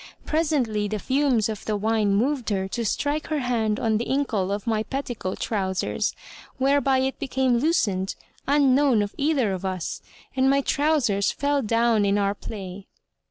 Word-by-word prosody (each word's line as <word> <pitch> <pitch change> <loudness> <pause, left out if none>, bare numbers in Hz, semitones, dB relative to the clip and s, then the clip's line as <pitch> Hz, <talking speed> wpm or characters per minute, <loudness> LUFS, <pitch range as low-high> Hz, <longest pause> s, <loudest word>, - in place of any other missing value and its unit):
Presently, 275 -10 0
the 215 +1 -2
fumes 260 -1 +1
of 215 -2 -5
the 215 -1 -1
wine 210 -1 +1
moved 250 +2 0
her 190 -2 -1
to 235 +3 -2
strike 290 +7 -1
her 310 - -1
hand 225 -4 0
on 220 -2 +1
the 235 - -3
inkle 230 -9 0
of 205 0 -3
my 220 -2 +1
petticoat 240 -6 -4
trousers, 190 -4 -1 0.4
whereby 275 0 +3
it 265 +1 -1
became 260 -2 +1
loosed, 205 - 0 0.3
unknown 275 -4 +4
of 205 - -5
either 280 -8 +1
of 185 0 -5
us, 185 -3 -3 0.3
and 265 0 +3
my 275 +1 +3
trousers 275 -10 +1
fell 285 0 0
down 230 -1 +2
in 200 0 +2
our 200 -1 +1
play. 195 -2 -8
230 Hz, 160 wpm, -24 LUFS, 205-275 Hz, 0.4 s, unknown